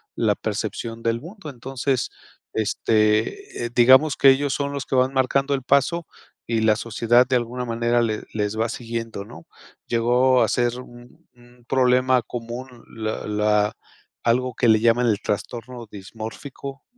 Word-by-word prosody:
la - - +2
percepción 115 0 -4
del 115 0 0
mundo. 170 0 -10
Entonces, 130 0 -2 0.4
este, 110 - 0
eh, - - -3
digamos 130 +5 +6
que 135 - +7
ellos 140 0 0
son 140 +1 -2
los 140 - -4
que - - -2
van 130 +1 +2
marcando 135 +1 +1
el 135 - -1
paso 140 +5 +1 0.4
y 115 -1 0
la 110 -1 +4
sociedad 115 +2 +2
de 130 - +1
alguna 125 +1 -4
manera 120 0 +1
le 110 -2 -1
les 105 0 -2
va 115 - +2
siguiendo, 115 -3 -5
¿no? 85 -7 -13 0.4
Llegó 125 +2 +3
a - - +3
ser 120 0 0
un 120 -1 -15
un 120 0 -21
problema 130 -1 +3
común, 120 +2 -8
la 110 -1 -4
la 105 0 +1 0.5
algo 125 +1 +1
que 120 - +2
le 110 -1 +5
llaman 120 +1 +3
el 105 -3 +1
trastorno 120 +3 -5
dismórfico, 115 +7 -8
120 Hz, 155 wpm, -23 LUFS, 115-130 Hz, 0.5 s, que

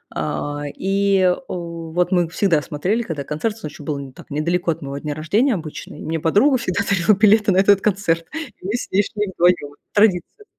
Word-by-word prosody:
А, 145 0 -3
и, 195 0 +1 0.2
о, 170 -2 -6
вот 180 +3 +1
мы 175 -3 +2
всегда 170 -3 +2
смотрели, 180 +11 -1
когда 160 -10 -4
концерт, 205 +11 -3
с 220 - -17
он - - -4
еще 150 - -12
был 145 0 -3
не 135 -1 -8
так - - -14
недалеко 170 +4 0
от 160 - -5
моего 140 0 -5
дня 150 0 -4
рождения 210 - +1
обычно. 155 -3 -7
И - - -9
мне 160 +1 -2
подруга 210 - +3
всегда 200 -5 -1
дарила 200 +1 +4
билеты 210 -1 +5
на 185 - +2
этот 195 0 +5
концерт. 180 -5 0
И 315 - -8
мы 205 - -2
с 245 - -4
ней 200 +2 +3
шли 210 -1 -3
вдвоём. 170 -5 +2 0.2
Традиция. 210 - +2
180 Hz, 210 wpm, -21 LUFS, 155-205 Hz, 0.2 s, билеты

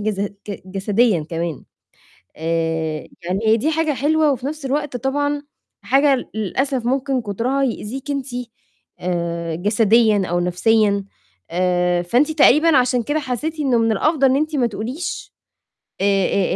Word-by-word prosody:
جس 205 -2 -2
ج 200 - -1 0.4
جسديًا 195 -2 +1
كمان. 165 -2 -3 0.7
آآ 160 -1 -2 0.2
يعني 180 +3 -1
هي 220 +1 +5
دي 300 +8 0
حاجة 315 -1 +1
حلوة، 300 +2 +2
وفي 255 -1 -3
نفس 295 0 -5
الوقت 285 -1 -2
طبعًا 285 +3 -1 0.4
حاجة 275 -1 +2
للأسف 245 +5 -1
ممكن 265 0 0
كترها 235 +7 -1
يؤذيكِ 265 +2 -3
أنتِ، 275 -1 -3 0.7
آآ 170 -2 -2
جسديًا 215 +2 +3
أو 175 0 -1
نفسيًا. 200 +3 +2 0.5
آآ 180 0 +1
فأنتِ 245 - +2
تقريبًا 305 0 +5
عشان 250 -1 +2
كده 295 +5 -1
حسيتِ 300 +4 -4
إنه 260 -5 +2
من 225 0 +2
الأفضل 275 +5 +2
إن 260 - +3
أنتِ 310 +2 0
ما 250 -3 +2
تقوليش، 250 - -5 0.7
آآ، 195 -1 +2
235 Hz, 140 wpm, -20 LUFS, 190-275 Hz, 0.7 s, هي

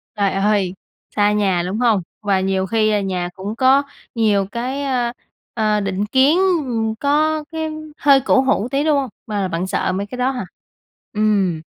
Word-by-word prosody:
Trời 200 -2 +1
ơi! 195 -1 +1 0.4
Xa 205 -1 +3
nhà, 195 -4 +1
đúng 200 +4 -3
hông? 230 -5 +3 0.2
Và 200 -2 +1
nhiều 190 0 0
khi 215 +2 +1
là 210 -1 +1
nhà 180 -2 -2
cũng 200 +3 -6
có 265 +3 +4 0.3
nhiều 210 -4 +2
cái, 255 +4 -3
ơ, 250 -3 0 0.4
ờ, 215 -2 +1
định 195 0 -2
kiến, 265 +8 +3 0.3
ừm, 225 -3 -1
có 300 +4 +1
cái 320 -1 -3 0.3
hơi 275 -2 +5
cổ 265 - +4
hủ 260 -5 +1
tí, 275 +1 +1
đúng 305 -2 +3
hông? 270 -2 -1 0.2
Và 205 -3 -1
bạn 175 +1 -3
sợ 185 - -1
mấy 200 +1 -3
cái 250 - -8
đó 250 +1 +1
hả? 250 -7 -4 0.7
Ừm. 205 -6 +1
215 Hz, 185 wpm, -19 LUFS, 195-260 Hz, 0.7 s, hơi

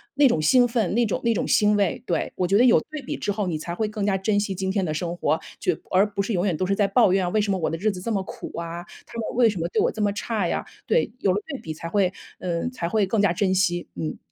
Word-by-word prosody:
那 285 0 +6
种 160 -11 +1
兴 245 +11 +5
奋， 230 -6 0
那 240 0 +3
种 210 - -2
那 235 - +3
种 - - -1
欣 210 0 +4
慰。 200 -4 0
对， 170 - -1
我 180 - 0
觉 195 - +3
得 245 - +5
有 245 - +6
对 310 -1 -5
比 - - -4
之 205 - -2
后， 205 0 -1
你 165 - -1
才 170 +2 -5
会 215 +3 -1
更 210 -1 -4
加 195 -2 +2
珍 205 +2 +1
惜 205 -2 -2
今 190 +1 -2
天 195 -1 0
的 155 - -2
生 170 +2 -3
活， 160 -2 +1 0.2
去 175 -3 0
而 190 +2 +5
不 200 - 0
是 220 - -2
永 180 -2 +1
远 185 -5 +1
都 185 - 0
是 195 - +1
在 200 -1 +2
抱 200 -2 +4
怨， 185 -2 +1
为 215 - +3
什 205 -1 0
么 190 - +1
我 165 - 0
的 165 - -3
日 215 +5 +1
子 185 -2 -7
这 230 - -3
么 195 -3 0
苦 - - -8
啊， 170 +1 -5 0.2
他 230 - -8
们 225 - -3
为 240 -2 +5
什 200 - -4
么 165 - -1
对 - - 0
我 - - +2
这 220 - -5
么 205 -1 +2
差 210 -3 -1
呀， - - -2 0.2
对， 480 - +2
有 195 - +2
了 195 - 0
对 280 -4 -5
比 160 - -5
才 165 - -6
会 190 -1 +2 0.3
嗯， 175 +6 -2
才 170 -9 -3
会 210 +1 +2
更 200 +2 +1
加 200 -4 +3
珍 190 +1 +1
惜， 175 -2 +1
嗯。 80 -3 -4
195 Hz, 330 characters per minute, -24 LUFS, 175-215 Hz, 0.3 s, 那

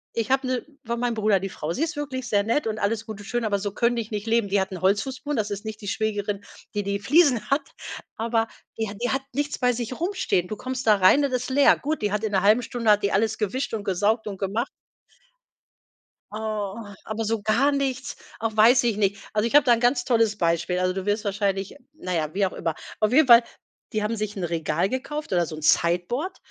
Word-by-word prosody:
ich 230 -2 -1
habe 265 0 +2
'ne 255 -1 -1 0.2
von 235 +1 -2
mein 240 -1 0
Bruder 215 -2 +2
die 195 +1 -4
Frau. 160 -2 -4
Sie 270 - -4
ist 330 +1 -2
wirklich 265 -4 -4
sehr 205 -3 +2
nett 230 +5 0
und 215 -1 -2
alles 215 +1 -1
gut 215 -2 -7
und 205 - -10
schön, 240 +3 -2
aber 205 -2 +1
so 200 +1 -3
könnte 235 +3 +1
ich 225 -1 -5
nicht 210 +1 -4
leben. 230 -2 +2
Die 200 0 +2
hat 190 - -2
'nen 185 -2 -7
Holzfußboden, 255 +9 0
das 215 -1 -1
ist 205 +1 -5
nicht 220 0 -6
die 205 - -8
Schwägerin, 205 -1 -2 0.3
die 205 - 0
die 200 0 -2
Fliesen 275 0 +3
hat, 275 0 +1 0.5
aber 225 0 0 0.3
die 220 - -1
hat 200 0 -8
die 245 - +1
hat 270 0 -1
nichts 290 +2 -2
bei 250 -1 +2
sich 240 +3 -5
rumstehen. 345 - 0
Du 215 - -4
kommst 255 +3 -5
da 215 -2 +5
rein 200 +10 +5
und 275 - -2
es 250 -1 0
ist - - -6
leer. 280 +1 +5
Gut, 300 -3 -3
die 205 - +1
hat 210 +1 -1
in 220 - -1
'ner 190 -1 +1
halben 215 +4 +5
Stunde 230 -2 +1
hat 210 0 +4
die 200 - 0
alles 220 +2 +1
gewischt 225 +6 -2
und 215 -2 -3
gesaugt 210 +4 +1
und 200 -2 -5
gemacht. 210 +7 -2 1.6
Oh, 215 -2 -3 0.3
aber 220 +1 -3
so 220 0 -1
gar 220 +7 +2
nichts 275 -2 -2 0.2
auch 220 -1 -2
weiß 235 +4 +6
ich 230 -4 +1
nicht. 200 -1 +1
Also, 215 +1 +1
ich 235 - -4
hab 295 - +7
da 240 -3 +5
ganz 245 +2 +2
tolles 225 -4 +2
Beispiel, 170 0 0
also, 185 0 +1
du 190 +1 -5
wirst 205 +1 0
wahrscheinlich 200 0 -1 0.2
na 185 -11 -5
ja, 155 -2 -2
wie 200 +1 +2
auch 185 - -5
immer. 165 -2 -2 0.2
Auf 215 +1 +1
jeden 290 +1 +5
Fall, 235 0 +9 0.5
die 215 -2 -1
haben 215 +2 -1
sich 210 0 -4
'n 190 - -4
Regal 170 +1 0
gekauft 295 +4 -4
oder 175 -2 +2
so 155 - -7
'n 155 - -8
Sideboard 180 - +1
215 Hz, 240 wpm, -24 LUFS, 200-245 Hz, 1.6 s, Fall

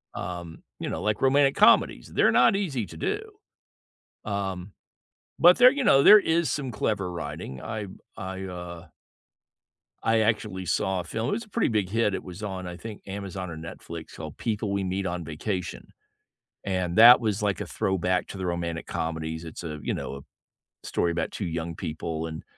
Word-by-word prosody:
Um, 85 -2 -6 0.2
you - - -3
know, - - -3
like, 105 -1 0
romantic 135 +1 +4
comedies, - - +4
they're - - +4
not 125 +10 +5
easy 145 - -1
to - - -11
do. 420 - -1 1.1
Um, 95 -2 -3 0.7
but 175 +2 +7
there 250 +1 +8
you 280 0 -2
know, 140 - +5
there 215 - +10
is 170 -3 +1
some 135 -4 -3
clever 105 -3 -1
writing, 75 -4 -6
I 105 -2 -5 0.3
I, 95 0 -5
uh 90 -2 -7 1.2
I 115 0 +3
actually 105 -4 0
saw 95 +3 0
a 85 - -6
film 110 +6 -3
it - - -1
was 230 +3 -2
a 215 - -22
pretty 230 +2 +1
big 105 -5 0
hit, 105 0 +1
it - - -4
was 90 +3 -9
on, 95 -3 -4
I 90 0 -6
think, 110 +1 -9
Amazon 95 -2 -5
or 80 - -7
Netflix, 80 +1 -9
called - - -8
People 105 -2 -2
We 100 0 0
Meet 95 +1 -2
on 85 -1 -3
Vacation, 85 +2 -4 0.8
and 90 -2 -1
that 120 +3 +10
was, 105 -2 -1
like, 100 -2 0
a - - -3
throwback 90 -1 0
to 100 - -7
the 95 - -3
romantic 85 -1 -3
comedies 80 0 -3
it's 80 +1 -8
a, 75 -2 -5
you - - -1
know - - -5
a 70 - -10 0.7
story 85 - 0
about 85 - -2
two 100 - -4
young 85 0 -3
people, 80 -1 -4
and 80 -1 -7
95 Hz, 185 wpm, -26 LUFS, 85-110 Hz, 1.2 s, there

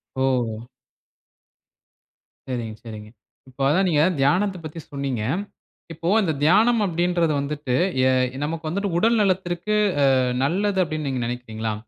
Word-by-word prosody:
ஓ! 120 -4 -1 1.8
சரிங்க, 120 -4 -4
சரிங்க. 105 -2 -9 0.4
இப்ப 130 +1 -10
அதான் 185 +6 +2
நீங்க 150 -3 +3 0.2
தியானத்த 185 +8 +2
பத்தி 155 +2 -7
சொன்னீங்க. 135 -5 -3 0.7
இப்போ 165 +1 -6
அந்த 180 -6 0
தியானம் 220 +8 +4
அப்படீன்றது 175 -2 +1
வந்துட்டு, 140 -2 -2 0.3
எ - - +4 0.3
நமக்கு 160 +1 -4
வந்துட்டு 200 +4 -2
உடல் 230 +5 +3
நலத்திற்கு 185 0 0 0.4
அ - - +4 0.3
நல்லது 190 +6 +1
அப்டினு 155 -2 -4
நீங்க 130 -2 -2
நெனைக்கிறீங்களா? 115 -2 -4
155 Hz, 120 wpm, -23 LUFS, 130-180 Hz, 1.8 s, தியானம்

